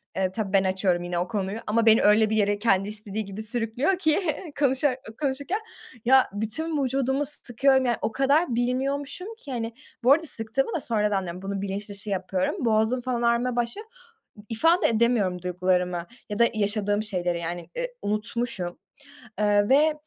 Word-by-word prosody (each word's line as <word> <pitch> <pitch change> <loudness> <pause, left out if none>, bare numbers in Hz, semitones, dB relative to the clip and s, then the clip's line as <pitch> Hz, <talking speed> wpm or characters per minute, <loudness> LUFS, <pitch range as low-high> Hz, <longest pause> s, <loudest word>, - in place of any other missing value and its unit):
e, 190 -1 0
tabii 200 -1 -4
ben 195 -1 +5
açıyorum 185 -2 +1
yine 175 0 -2
o 180 - -1
konuyu, 205 0 -3
ama 230 +2 +2
beni 220 0 +6
öyle 210 +1 +5
bir 220 - 0
yere, 205 0 +2
kendi 195 -2 +2
istediği 210 0 -5
gibi 200 +2 -7
sürüklüyor 240 - 0
ki, 315 0 +2 0.4
konuşurak 265 -1 +2 0.2
konuşurken, 285 +8 -1 0.5
ya, 265 +1 +5
bütün 280 +9 -2
vücudumu 265 +2 0
sıkıyorum, 265 -1 +2
yani, 240 -1 +1
o 220 - -1
kadar 275 +2 +2
bilmiyormuşum 275 - -1
ki, 285 - -10
hani 230 -2 -3 0.3
bu 255 - +5
arada 325 +3 +4
sıktığımı 255 +1 0
da 330 - 0
sonradan 210 -5 0
diyorum, 180 +1 -7
bunun 195 0 -4
bilinçdışı 200 +1 -4
yapıyorum, 190 - -1
boğazım 220 +3 +2
falan 245 -1 -2
ağrımaya 235 +1 +1
başlıyor, 245 - -1 0.6
ifade 330 +11 +3
edemiyorum 220 -6 +1
duygularımı, 180 -1 0 0.2
ya 210 - -4
da 235 - +7
yaşadığım 205 0 0
şeyleri 175 -4 -1
yani, 170 +1 -4 0.2
ııı, - - -1
unutmuşum, 210 -3 -3 0.6
ııı, 205 +1 +3
ve 300 +3 +5
220 Hz, 160 wpm, -25 LUFS, 200-265 Hz, 0.6 s, da